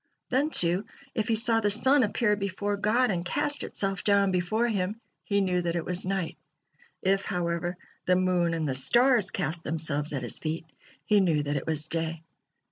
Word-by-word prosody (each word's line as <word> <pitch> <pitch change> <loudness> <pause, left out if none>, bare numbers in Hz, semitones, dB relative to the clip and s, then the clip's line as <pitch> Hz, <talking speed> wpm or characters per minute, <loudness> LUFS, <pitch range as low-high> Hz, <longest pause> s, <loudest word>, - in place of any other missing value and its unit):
Then, 275 +4 +1
too, 180 - +4 0.3
if 220 -1 -2
he 225 - +2
saw 225 0 +5
the 210 -2 +1
sun 260 +7 +4
appear 210 -1 +1
before 200 0 -3
God 220 +4 +1
and 175 -2 -2
cast 285 +10 0
itself 195 -1 0
down 200 -1 +3
before 185 +6 0
Him, 205 -1 -2 0.3
he 200 -3 +1
knew 180 -2 0
that 170 -1 -2
it 170 - -2
was 180 0 -1
night; 190 -3 -2 0.7
if, 195 +1 +2
however, 175 0 -2 0.3
the 180 - +4
moon 180 -2 +1
and 160 -2 -2
the 135 - -1
stars 235 - +3
cast 170 -3 -2
themselves 150 -1 -1
at 135 -4 -3
His 120 - -2
feet, 160 +1 -4 0.4
he 210 -1 +4
knew 165 -6 +2
that 145 0 -2
it 140 - -4
was 155 -1 -1
day. 165 0 -3
185 Hz, 190 wpm, -27 LUFS, 165-210 Hz, 0.7 s, saw